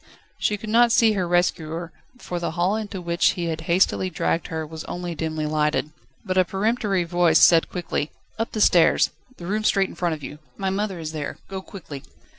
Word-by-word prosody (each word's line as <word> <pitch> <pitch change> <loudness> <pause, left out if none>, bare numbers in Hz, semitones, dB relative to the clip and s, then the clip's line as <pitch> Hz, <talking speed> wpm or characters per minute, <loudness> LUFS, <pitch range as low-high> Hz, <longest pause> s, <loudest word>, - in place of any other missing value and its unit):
She 210 - +1
could 215 +1 -7
not 235 +1 +5
see 225 -1 +5
her 190 -4 -1
rescuer, 170 -1 0 0.3
for 175 -7 -5
the 170 - -2
hall 180 +4 +2
into 215 -3 -4
which 170 -1 +2
he 175 - -3
had 160 0 -3
hastily 185 +1 +2
dragged 165 -1 -1
her 160 -1 -4
was 160 0 -8
only 175 -1 -4
dimly 155 -1 -3
lighted. 150 0 0 0.3
But 185 -1 +1
a - - +6
peremptory 200 0 0
voice 170 -1 +3
said 165 -2 +6
quickly: 170 -4 -3 0.3
"Up 225 - -2
the 215 - -1
stairs, 175 -4 +5 0.3
the 175 - -9
room 210 +4 -1
straight 195 -2 +2
in - - -11
front 175 -3 -1
of 150 - -13
you, 150 +2 -8 0.2
my 190 -1 -1
mother 195 -1 -2
is 160 -2 -5
there. 150 -2 -5
Go 190 -1 -5
quickly." 175 -9 -9
175 Hz, 205 wpm, -23 LUFS, 160-195 Hz, 0.3 s, a